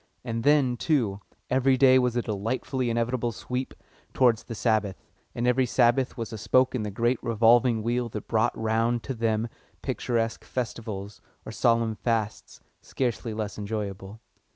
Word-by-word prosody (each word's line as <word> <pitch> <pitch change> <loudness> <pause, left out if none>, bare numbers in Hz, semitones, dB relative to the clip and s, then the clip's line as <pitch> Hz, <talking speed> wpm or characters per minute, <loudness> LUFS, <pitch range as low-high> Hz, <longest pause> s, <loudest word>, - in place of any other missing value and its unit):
And 115 -2 -3
then, 140 -4 +3
too, 115 -12 0 0.3
every 130 +1 +3
day 130 0 +6
was 125 -2 0
a 120 - 0
delightfully 120 +4 -2
inevitable 120 +1 0
sweep 125 +3 -5 0.4
towards 120 -4 +4
the 115 - -6
Sabbath, 110 -4 +1 0.4
and 120 - -1
every 125 +1 +3
Sabbath 125 +2 +2
was 115 -1 -5
a 110 - -6
spoke 125 +4 +3
in 125 - -1
the 105 - -3
great 120 +4 0
revolving 115 0 +3
wheel 120 +1 -1
that 105 -2 -7
brought 110 -1 +1
round 115 +2 +1
to 135 - -4
them 115 -1 0 0.4
picturesque 115 -2 -1
Festivals, 110 -5 -5 0.2
or - - -6
solemn 115 -1 +2
Fasts, 115 -3 -2 0.2
scarcely 120 -3 -2
less 105 -1 -4
enjoyable. 100 -1 -5
115 Hz, 155 wpm, -26 LUFS, 110-125 Hz, 0.4 s, day